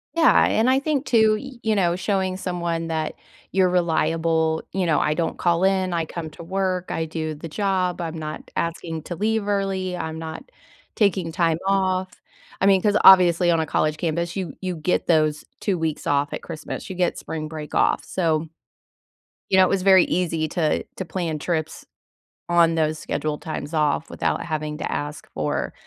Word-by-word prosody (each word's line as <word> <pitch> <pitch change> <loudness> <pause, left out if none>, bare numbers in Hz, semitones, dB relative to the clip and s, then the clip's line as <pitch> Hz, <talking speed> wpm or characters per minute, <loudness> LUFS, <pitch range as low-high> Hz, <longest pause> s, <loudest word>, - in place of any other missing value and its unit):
Yeah, 330 -1 +5
and 225 +3 +2
I 265 +1 +4
think 285 -1 -1
too, 220 -2 +4
y 270 -1 -10
you 220 -1 +1
know, 175 -4 +2
showing 190 0 -1
someone 170 -3 -2
that 160 -1 -2 0.4
you're 185 -1 +3
reliable, 160 -2 +1
you 190 -2 0
know, 160 - +2
I 150 - +1
don't 165 +1 -2
call 170 0 +1
in, 190 -2 +2
I 165 -1 0
come 160 -1 -6
to 170 - -11
work, 185 0 -2
I 160 0 -1
do 155 -1 -4
the 160 +3 -8
job, 185 0 -1
I'm 165 -1 -4
not 155 0 -6
asking 165 -1 -3
to 175 - -6
leave 215 +2 0
early, 195 -2 -1
I'm 160 -2 -4
not 160 - -7 0.5
taking 190 -6 +1
time 165 -2 +1
off, 190 -1 +1 0.5
I - - +2
mean, 195 -2 +5
'cause 210 -1 +3
obviously 175 -2 +7
on 165 - +2
a 160 - 0
college 155 0 0
campus, 170 +1 -2
you 185 -6 -4
you 185 -1 -3
get 165 +3 -1
those 155 -2 +2
2 195 -3 0
weeks 160 -2 -3
off 145 0 +1
at - - -4
Christmas, 155 -3 -7
you 190 - -5
get 180 -1 0
spring 155 -1 -5
break 155 -1 -7
off, - - +2
so 160 -3 -1 1.0
you 190 - +4
know, 190 - +7
it - - 0
was 195 -2 +1
very 190 -2 +6
easy 165 -3 0
to 160 -3 0
to 190 - -5
plan 165 -2 -3
trips 160 -1 -3 0.6
on 170 -1 +4
those 155 -1 0
scheduled 150 0 -3
times 155 -1 -5
off 150 0 +1
without - - -1
having 155 -2 -3
to - - -4
ask 145 +1 -4
for - - -2
170 Hz, 190 wpm, -23 LUFS, 160-190 Hz, 1.0 s, obviously